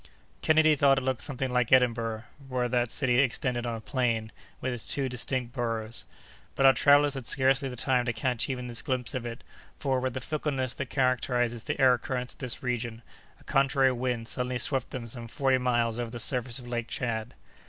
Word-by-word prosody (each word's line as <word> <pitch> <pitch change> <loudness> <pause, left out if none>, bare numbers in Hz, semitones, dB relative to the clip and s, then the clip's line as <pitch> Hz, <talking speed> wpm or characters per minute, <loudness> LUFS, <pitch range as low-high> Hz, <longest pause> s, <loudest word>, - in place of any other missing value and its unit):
Kennedy 155 0 +4
thought 135 -1 +4
it 135 - -1
looked 130 -3 -1
something 135 -2 -3
like 125 -2 +1
Edinburgh, 115 -3 +2 0.3
were 125 -1 0
that 120 -1 0
city 125 -2 +1
extended 125 -2 0
on 115 - -2
a - - -6
plain, 115 -4 -1 0.3
with 130 0 -2
its 120 - -6
two 140 -2 +1
distinct 125 -1 -2
boroughs. 115 -4 -3 0.5
But 135 - +2
our 135 - +8
travellers 145 +1 +5
had 135 -4 -6
scarcely 135 0 +2
the 125 - -7
time 125 0 +1
to 120 - 0
catch 120 +1 0
even 125 -2 -3
this 120 -2 -5
glimpse 125 -4 -2
of 125 -2 -3
it, 115 0 -8 0.3
for, 135 -3 0
with 130 -1 -3
the - - -1
fickleness 135 -3 -2
that 135 -1 -5
characterizes 125 -3 0
the 145 -1 -3
air 130 -3 +5
currents 125 0 -3
of - - -16
this 125 -3 -4
region, 120 -2 -3 0.4
a - - -20
contrary 135 -1 +3
wind 120 -2 -2
suddenly 125 0 0
swept 135 0 +3
them 125 -3 -6
some 115 0 -7
forty 130 +2 +1
miles 120 -2 +1
over 120 -1 -3
the 120 +1 -7
surface 125 +1 +1
of 125 -2 -7
Lake 120 -1 -3
Tchad. 115 -1 -3
125 Hz, 205 wpm, -28 LUFS, 120-130 Hz, 0.5 s, our